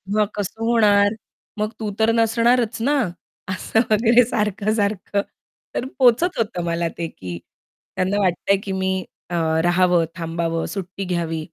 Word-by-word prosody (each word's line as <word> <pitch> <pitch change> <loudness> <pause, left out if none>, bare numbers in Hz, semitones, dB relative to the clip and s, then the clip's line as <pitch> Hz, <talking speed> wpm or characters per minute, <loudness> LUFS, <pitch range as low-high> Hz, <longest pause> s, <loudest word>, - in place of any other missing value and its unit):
मग 215 - +4
कसं 210 +2 -4
होणार? 205 -3 +4 0.4
मग 215 +1 -1
तू 215 -2 -3
तर 220 +1 +4
नसणारच 230 +1 +2
ना!" 285 +4 +2 0.5
असं 190 +4 0
वगैरे 230 +3 +5
सारखं-सारखं 210 -2 0 0.5
तर 255 - -1
पोहचत 260 +8 +4
होतं 210 -6 -1
मला 170 0 -1
ते, 170 -1 -2
की 90 - -8 0.6
त्यांना 190 +2 0
वाटतंय 190 +1 +2
की 195 - -4
मी 190 -1 -1 0.3
अ, - - -1 0.3
राहावं, 175 -1 +3
थांबावं, 165 0 -2
सुट्टी 195 0 -5
घ्यावी. 170 -3 -2
200 Hz, 135 wpm, -21 LUFS, 175-225 Hz, 0.6 s, वगैरे